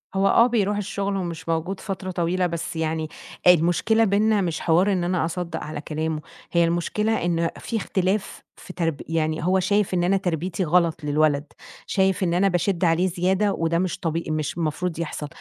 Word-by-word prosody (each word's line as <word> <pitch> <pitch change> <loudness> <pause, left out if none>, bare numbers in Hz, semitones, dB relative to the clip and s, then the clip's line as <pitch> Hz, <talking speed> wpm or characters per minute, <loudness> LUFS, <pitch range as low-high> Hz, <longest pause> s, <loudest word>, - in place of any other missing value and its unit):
هو 195 +1 +3
آه، 230 +4 +5
بيروح 210 -4 +1
الشُغل 200 -1 -2
ومش 170 -3 -5
موجود 165 +4 -1
فترة 190 -2 -5
طويلة، 180 +1 0
بس 170 0 -4
يعني 160 -1 -2 0.4
المشكلة 180 +6 +4
بيننا 210 0 +3
مش 170 -3 -2
حوار 180 +5 +3
إن 180 -2 0
أنا 175 -1 0
أصدَّق 170 -1 -4
على 150 -1 -5
كلامه، 155 0 -3 0.3
هي 170 -1 +4
المشكلة 175 +5 0
إن 170 -1 +1
في 230 - -3
اختلاف 195 -1 -1
في 185 - -11
ترب 165 -4 -2
يعني 160 -1 -1
هو 190 +1 +3
شايف 200 +1 +1
إن 175 - +1
أنا 195 +2 +3
تربيتي 180 0 -2
غلط 170 -1 +2
للولد، 145 0 +2 0.4
شايف 190 -1 +1
إن 170 - +1
أنا 190 +3 +3
باشِد 180 0 0
عليه 165 +3 +3
زيادة 190 +3 +1
وده 165 +1 0
مش 185 -1 -2
طبي 165 0 -2
مش 155 +1 -2
المفروض 165 +1 -2
يحصل. 155 -2 -4
175 Hz, 180 wpm, -24 LUFS, 165-190 Hz, 0.4 s, آه